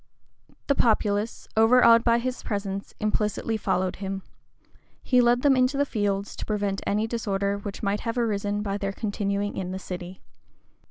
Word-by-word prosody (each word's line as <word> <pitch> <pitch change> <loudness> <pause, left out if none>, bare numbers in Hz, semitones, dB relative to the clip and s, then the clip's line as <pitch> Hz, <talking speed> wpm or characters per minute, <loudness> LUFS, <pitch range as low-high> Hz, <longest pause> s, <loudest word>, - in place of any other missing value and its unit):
The 280 - +3
populace, 215 -3 +1
overawed 230 +1 +6
by 235 -1 +4
his 250 +1 -3
presence, 200 -2 -4
implicitly 215 +1 -1
followed 185 -3 -1
him. 195 -1 -4 0.8
He 250 -1 +4
led 240 +1 +3
them 280 -2 +5
into 255 +2 +2
the 285 - +2
fields, 205 -4 -2
to - - -5
prevent 205 -2 -1
any 210 +2 +1
disorder 200 -3 -1
which 200 0 -7
might 200 +1 0
have 230 0 -3
arisen 205 -3 0
by 200 -1 -2
their 195 -1 -2
continuing 205 -1 -2
in 185 -1 -3
the - - -3
city. 180 -1 -7
205 Hz, 160 wpm, -26 LUFS, 200-230 Hz, 0.8 s, overawed